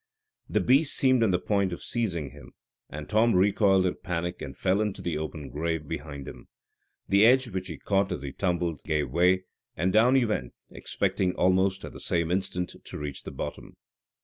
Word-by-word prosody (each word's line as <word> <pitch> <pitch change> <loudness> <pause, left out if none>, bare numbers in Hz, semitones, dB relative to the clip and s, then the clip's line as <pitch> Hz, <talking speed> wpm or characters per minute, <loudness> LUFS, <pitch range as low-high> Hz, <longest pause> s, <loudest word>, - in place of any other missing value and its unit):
This - - +1
beast 140 +4 +4
seemed 130 -2 +4
on 115 - +4
the 90 - +3
point 100 0 0
of 85 - -6
seizing 85 - -2
him, 75 +1 -14 0.4
and 75 0 -7
Tom 110 +1 +3
recoiled 95 0 +4
in 90 - -1
panic 90 0 -3
and 65 -2 -7
fell 95 +2 +1
into 105 -2 -2
the 85 -3 -3
open 75 -3 -6
grave 80 0 -2
behind 70 -2 -6
him. - - -10 0.6
The 100 +1 +4
edge 125 +2 +5
which 95 -2 -4
he 80 -4 -6
caught 100 -1 0
as 90 - -4
he 70 - -5
tumbled 85 -3 -1
gave 75 -1 -1
way, 90 +2 +3 0.3
and 90 +3 +1
down 120 +5 +5
he 130 -3 +4
went, 85 - -2 0.2
expecting 90 -2 -1
almost 95 +1 +2
at - - -9
the - - -10
same 85 -1 -1
instant 90 -1 -1
to - - -8
reach 75 -2 -5
the - - -8
bottom. - - -7
90 Hz, 195 wpm, -27 LUFS, 80-100 Hz, 0.6 s, edge